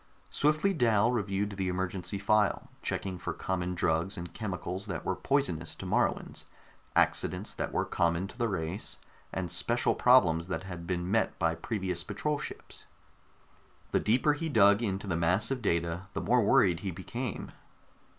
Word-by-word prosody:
Swiftly 155 +7 +2
Dal 115 - +3
reviewed 100 -3 -1
the 95 -1 -2
emergency 90 +1 -2
file, 105 +1 +1
checking 95 -2 -3
for - - -3
common 90 -1 -2
drugs 85 +2 0
and 85 0 -7
chemicals 95 -1 -4
that 95 - -4
were 95 - 0
poisonous 110 - 0
to - - -8
Moruans, - - 0 0.5
accidents - - +1
that - - -3
were - - 0
common 85 +2 +1
to - - -11
the 120 -1 0
race, 90 -1 -3 0.3
and 90 -3 -3
special - - +1
problems 80 +1 +4
that 95 - -3
had 90 -3 -7
been 90 0 -2
met 110 +1 +1
by 85 -2 +2
previous 95 -2 -3
patrol 145 +10 -2
ships. - - -8 1.1
The - - +3
deeper 130 +7 +3
he 160 +2 -3
dug 100 -5 +5
into 100 -3 -2
the 95 -4 -1
mass 90 +8 +1
of 130 -2 -1
data, 85 -1 -1
the - - -2
more 125 0 +3
worried 90 -4 +4
he 100 - -3
became. 105 +7 -5
95 Hz, 160 wpm, -30 LUFS, 90-110 Hz, 1.1 s, dug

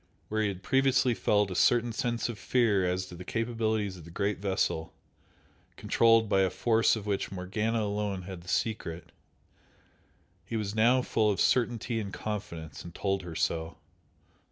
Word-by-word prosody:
Where 110 0 0
he 105 - +2
had 95 -2 -5
previously 130 0 +3
felt 105 -3 +1
a - - -4
certain 120 +4 +3
sense 120 +1 -1
of 115 -4 -6
fear 105 -2 +2
as 90 +1 -1
to 90 - -10
the 90 - -8
capabilities 110 -2 -1
of 85 - -12
the 85 - -12
great 100 +3 -1
vessel, 95 -4 -1 0.8
controlled 115 -1 +3
by 100 -2 +3
a 95 - +3
force 110 +6 +2
of 110 -2 -6
which 100 -2 -2
Morgana 105 +5 -1
alone 100 -2 -2
had 90 -1 -8
the 85 - -17
secret, 90 -6 -2 1.3
he 115 - -4
was 105 -2 -3
now 120 +4 +4
full 110 -3 +1
of 100 - 0
certainty 120 -1 +1
and 100 -3 -5
confidence, 100 -9 -6
and 85 -1 -10
told 95 -1 -1
her 85 -2 -8
so. 80 +1 -1
105 Hz, 170 wpm, -29 LUFS, 95-115 Hz, 1.3 s, now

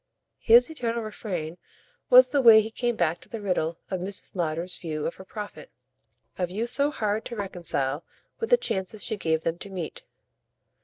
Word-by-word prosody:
His 240 +2 +6
eternal 235 -6 -2
refrain 180 -6 -5 0.5
was 255 0 +8
the 280 +1 +2
way 225 -3 +9
he 220 +1 -2
came 240 +1 -1
back 170 -3 0
to - - -12
the 230 - -5
riddle 175 -5 -1
of 185 - -1
Mrs. 195 +2 -5
Lowder's 170 +1 -2
view 155 -3 -4
of - - -3
her 190 - -10
profit 205 -6 -8 0.7
a 180 - +1
view 205 +6 -2
so 280 +4 +1
hard 215 -6 -1
to 240 - -6
reconcile 170 -8 -2 0.4
with 455 - -2
the - - +7
chances 190 - -3
she 220 - -1
gave 160 -5 0
them 165 +1 -2
to 200 - -8
meet. 180 -5 -6
200 Hz, 185 wpm, -26 LUFS, 170-230 Hz, 0.7 s, way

